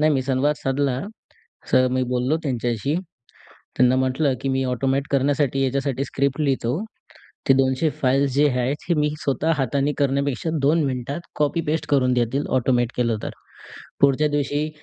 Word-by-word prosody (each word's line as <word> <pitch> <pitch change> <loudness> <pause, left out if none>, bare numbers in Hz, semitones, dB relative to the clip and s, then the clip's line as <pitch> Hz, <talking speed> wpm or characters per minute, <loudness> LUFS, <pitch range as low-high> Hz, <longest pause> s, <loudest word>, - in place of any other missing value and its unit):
नाही, 155 +1 +4
मी 135 -2 +1
संवाद 135 +3 +1
साधला, 135 -1 -1 0.7
असं 130 0 +3
मी 130 - +1
बोललो 125 +5 +1
त्यांच्याशी. 120 -1 -1 0.8
त्यांना 125 0 +4
म्हटलं 130 +2 +1
की 135 - -2
"मी 135 0 +1
ऑटोमॅट 135 +2 0
करण्यासाठी 140 0 +1
याच्यासाठी 135 0 -1
स्क्रिप्ट 140 +2 -1
लिहितो. 135 -5 0 0.8
ते 135 - +8
200 130 +3 +2
फाइल्स 135 +1 +2
जे 145 +2 +4
आहेत, 125 +1 0
हे - - +4
मी 150 0 +2
स्वतः 145 +4 0
हाताने 140 +2 0
करण्यापेक्षा 140 0 0
दोन 155 +4 +3
मिनिटात 135 +4 -3
कॉपी 150 +3 +1
पेस्ट 155 0 0
करून 130 -3 +3
देतील 125 +3 0
ऑटोमॅट 120 -1 +1
केलं 115 -3 +1
तर." - - -3 0.7
पुढच्या 140 +2 +4
दिवशी 145 +1 -1
135 Hz, 155 wpm, -22 LUFS, 130-145 Hz, 0.8 s, ते